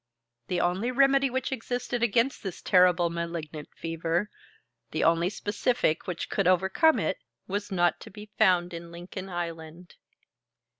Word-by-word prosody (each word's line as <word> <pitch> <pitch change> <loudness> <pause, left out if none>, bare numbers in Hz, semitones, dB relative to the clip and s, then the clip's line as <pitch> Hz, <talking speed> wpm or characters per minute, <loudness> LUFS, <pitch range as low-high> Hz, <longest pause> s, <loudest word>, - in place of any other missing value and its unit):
The 180 - -1
only 185 +7 0
remedy 275 +1 +4
which 260 +2 -2
existed 245 -1 -3
against 235 +3 +1
this 190 -4 -6
terrible 180 -2 +4
malignant 170 -3 -5
fever, 165 +4 -2 0.6
the 155 - -1
only 170 +2 +3
specific 205 -4 -1
which 175 -2 -3
could 195 -3 0
overcome 190 - +4
it, - - -1 0.3
was 205 +1 -4
not 175 -2 +2
to - - -11
be 210 +1 -12
found 175 -1 +3
in 170 0 -8
Lincoln 180 +3 -8
Island. 170 -1 -6
180 Hz, 140 wpm, -27 LUFS, 170-215 Hz, 0.6 s, remedy